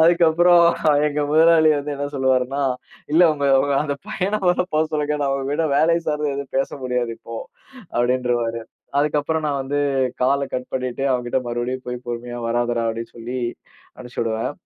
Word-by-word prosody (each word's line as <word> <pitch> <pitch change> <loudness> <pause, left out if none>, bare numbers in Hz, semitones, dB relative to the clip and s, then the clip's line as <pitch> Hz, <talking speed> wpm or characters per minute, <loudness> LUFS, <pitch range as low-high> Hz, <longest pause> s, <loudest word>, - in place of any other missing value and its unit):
அதுக்கப்புறம் 170 +1 +5 0.4
எங்க 150 0 -1
முதலாளி 160 0 +6
வந்து 145 +1 -4
என்ன 145 +1 -3
சொல்லுவாருன்னா, 130 +1 +1 0.5
இல்ல 170 +3 +6
உங்க 145 -1 -1
உங்க 140 +1 0
அந்த 145 - -2
பையன 205 0 -1
மொத 180 0 +3
போ 155 - +3
சொல்லுங்க, 150 0 0
நான் 140 -1 +1
உங்ககூட 145 +4 -1
வேலை 165 +3 +4
சார்ந்து 150 -1 -1
எதும் 140 -1 -6
பேச 135 - 0 0.2
முடியாது 125 -2 -1
இப்போ, 115 - -8 0.6
அப்டின்றவாரு. 120 -2 0 0.4
அதுக்கப்புறம் 150 +2 0
நான் 145 -2 -1
வந்து 145 +2 -1 0.4
கால்ல 140 +2 +2
கட் 125 0 -4
பண்ணிட்டு, 130 0 -3
அவன் 125 -1 0
கிட்ட 120 - +1
மறுபடியும் 120 +2 -3
போய் 125 0 -3
பொறுமையா 120 0 -5
வராதடா 120 0 0
அப்டின்னு 115 +1 -5
சொல்லி 120 +2 -5 0.6
அனுச்சுடுவேன். 115 -1 -3
135 Hz, 155 wpm, -21 LUFS, 125-150 Hz, 0.6 s, முதலாளி